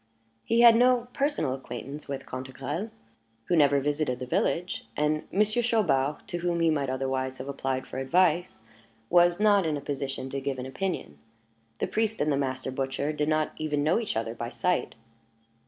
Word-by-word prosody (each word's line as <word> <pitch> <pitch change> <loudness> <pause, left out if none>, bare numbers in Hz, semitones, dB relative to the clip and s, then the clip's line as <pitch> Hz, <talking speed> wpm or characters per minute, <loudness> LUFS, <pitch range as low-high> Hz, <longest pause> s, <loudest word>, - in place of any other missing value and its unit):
He 230 +1 +2
had 235 -1 +9
no 245 0 +3
personal 275 - 0
acquaintance 135 +2 -7
with 140 -1 -5
Cantegrel, 130 - -5 0.6
who 175 - +1
never 145 -3 +5
visited 145 -2 -1
the 125 - -5
village; 170 +7 -1
and 150 +1 0
Monsieur 215 +4 +2
Chaubard 150 - +1
to 175 - -3
whom 175 0 0
he 165 -1 +4
might 140 -3 0
otherwise 130 0 -2
have 130 - -7
applied 135 -1 -2
for 130 - -6
advice, 170 -2 +1 0.5
was 175 +1 +5
not 205 -2 +5
in 155 -3 0
a - - -4
position 135 -2 -4
to 140 - -3
give 135 -1 -2
an 125 - -5
opinion; 135 - -4 0.6
the - - +1
priest 220 0 -1
and 150 +1 +1
the - - +2
master 130 -1 -2
butcher 135 +3 -2
did 150 0 -1
not 155 0 +1
even 150 -2 -1
know 160 +8 +3
each 220 - -3
other 115 0 -2
by 120 0 -5
sight. 180 +7 -1
150 Hz, 180 wpm, -28 LUFS, 135-180 Hz, 0.6 s, had